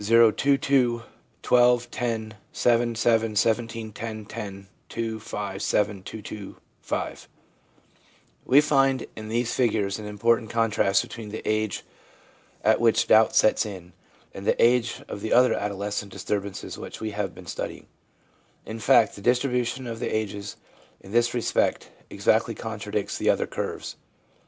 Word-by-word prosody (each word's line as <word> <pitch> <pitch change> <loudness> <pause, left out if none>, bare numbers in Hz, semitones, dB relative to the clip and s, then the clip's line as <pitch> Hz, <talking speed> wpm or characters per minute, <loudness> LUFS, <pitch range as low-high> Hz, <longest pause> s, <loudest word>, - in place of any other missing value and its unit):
o 115 -1 +7
2 140 +5 +2
2 125 -4 +2 0.4
12 120 -1 +4
10 110 -3 -3 0.2
7 120 -1 +2
7 115 -1 +2
17 115 0 0
10 110 0 -6
10 100 -2 -7 0.2
2 115 -1 -3
5 100 -2 -5
7 105 -2 0
2 105 +3 -8
2 100 -2 -8 0.3
5 - - -4 1.2
We 140 +3 +6
find 135 -3 +2
in 110 0 -7
these 120 +1 0
figures 105 -5 +1
an 105 - -7
important 115 +2 +1
contrast 110 -4 +2
between 115 -2 -8
the 110 - -7
age 110 -2 0 0.8
at 110 +1 +3
which 115 -1 +4
doubts 110 0 +5
set 110 - +4
in, 95 -5 -8 0.4
and 95 - -7
the - - +2
age 120 0 +3
of 100 - -6
the 110 - -4
other 125 +1 +5
adolescent 100 0 -3
disturbances 100 -2 -4
which - - -8
we 110 -1 -3
have 100 -3 -3
been 95 - -12
studying. 80 - -5 0.8
In 110 +1 -6
fact, 115 -2 +4
the 100 - -10
distribution 125 +1 +1
of 115 -2 -5
the - - -2
ages 105 -2 -3 0.5
in 95 - -13
this 120 +2 +2
respect 120 - 0 0.2
exactly - - +1
contradicts - - -4
the - - +1
other - - +2
curves. - - -5
110 Hz, 145 wpm, -25 LUFS, 105-120 Hz, 1.2 s, o